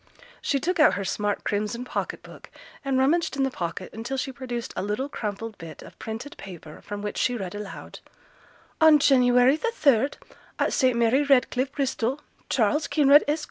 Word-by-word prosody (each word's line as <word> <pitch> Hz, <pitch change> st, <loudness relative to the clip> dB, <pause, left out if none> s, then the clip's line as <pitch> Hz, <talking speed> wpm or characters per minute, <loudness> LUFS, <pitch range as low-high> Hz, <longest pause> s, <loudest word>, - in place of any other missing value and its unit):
She 280 Hz, -, 0 dB
took 345 Hz, +4 st, -1 dB
out 305 Hz, -, +6 dB
her 200 Hz, -, -3 dB
smart 205 Hz, +1 st, -2 dB
crimson 215 Hz, +4 st, -2 dB
pocket -, -, -4 dB
book, -, -, -13 dB, 0.3 s
and 270 Hz, -1 st, 0 dB
rummaged 280 Hz, +3 st, +1 dB
in 270 Hz, -, +2 dB
the 270 Hz, -, 0 dB
pocket 170 Hz, -7 st, -5 dB
until 235 Hz, +5 st, -4 dB
she 265 Hz, +1 st, -3 dB
produced 245 Hz, -3 st, -6 dB
a -, -, -2 dB
little 210 Hz, +7 st, -2 dB
crumpled 220 Hz, -3 st, -5 dB
bit 165 Hz, -3 st, -10 dB
of -, -, -15 dB
printed 225 Hz, +6 st, -7 dB
paper, 170 Hz, -5 st, -11 dB
from 205 Hz, 0 st, -7 dB
which 210 Hz, -, -4 dB
she 245 Hz, -, +1 dB
read 190 Hz, -4 st, -5 dB
aloud, 205 Hz, -1 st, -8 dB, 0.8 s
'On 315 Hz, -1 st, +8 dB
January 255 Hz, -1 st, +4 dB
the 460 Hz, -, -1 dB
third, 275 Hz, 0 st, +2 dB, 0.4 s
at -, -, 0 dB
St 255 Hz, -3 st, +2 dB
Mary 235 Hz, +4 st, +3 dB
Redcliffe, 270 Hz, -1 st, +2 dB
Bristol, 270 Hz, -1 st, -1 dB, 0.3 s
Charles 270 Hz, +6 st, +1 dB
Kinraid, 290 Hz, -1 st, +5 dB
Esq. 300 Hz, +2 st, +1 dB
250 Hz, 180 wpm, -25 LUFS, 210-280 Hz, 0.8 s, On